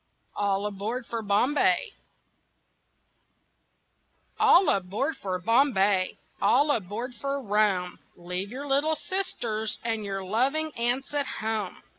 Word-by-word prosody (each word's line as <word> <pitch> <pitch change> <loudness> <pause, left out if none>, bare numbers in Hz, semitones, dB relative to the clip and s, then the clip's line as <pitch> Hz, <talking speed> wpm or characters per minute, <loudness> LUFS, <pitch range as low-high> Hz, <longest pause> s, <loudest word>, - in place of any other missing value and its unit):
ALL 200 0 0
ABOARD 210 +5 -3
FOR 230 -1 -4
BOMBAY 250 - +2 2.5
All 360 +2 +6
aboard 200 - 0
for 185 -2 -3
Bombay, 200 -3 +2 0.2
All 290 +1 +4
aboard 230 +2 -3
for 280 0 -1
Rome! 205 -6 0 0.2
Leave 180 +3 -4
your 265 +5 -6
little 285 +3 +2
sisters 230 - -2
And 225 -2 -1
your 195 -1 -4
loving 270 +11 0
aunts 245 +4 -1
at 285 -2 0
home. 215 -3 -3
220 Hz, 110 wpm, -27 LUFS, 200-275 Hz, 2.5 s, All